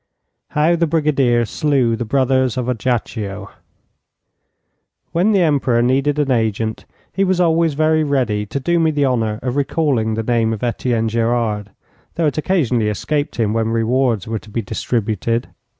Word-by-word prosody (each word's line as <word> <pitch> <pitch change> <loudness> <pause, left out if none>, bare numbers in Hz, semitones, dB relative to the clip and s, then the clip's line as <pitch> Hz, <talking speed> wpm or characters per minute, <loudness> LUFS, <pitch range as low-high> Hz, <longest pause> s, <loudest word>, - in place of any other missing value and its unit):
HOW 160 +3 +4
THE 170 0 +1
BRIGADIER 140 -7 +2
SLEW 130 -2 +1
THE 120 - -4
BROTHERS 130 0 +1
OF 125 -1 -2
AJACCIO 110 -4 -3 1.6
When 180 +6 +2
the 200 -3 +3
Emperor 135 -6 +2
needed 135 +4 +1
an 145 -3 +1
agent 110 -2 -1 0.3
he 195 - +1
was 185 -2 +1
always 165 -3 +2
very 155 +1 +2
ready 120 -8 0
to 140 - -3
do 170 +5 +1
me 160 -1 +3
the 145 -2 +1
honour 115 -5 0
of 125 0 -2
recalling 135 -6 0
the 115 - -2
name 115 -1 +1
of 110 - -6
Etienne 115 -1 0
Gerard, 115 -2 -1 0.5
though 170 - 0
it 150 0 0
occasionally 125 - +1
escaped 145 +8 -2
him 110 -3 0
when 115 0 0
rewards 115 -1 0
were 110 -1 -2
to 110 - -16
be 115 +2 -3
distributed. 110 +2 -2
125 Hz, 160 wpm, -18 LUFS, 110-150 Hz, 1.6 s, HOW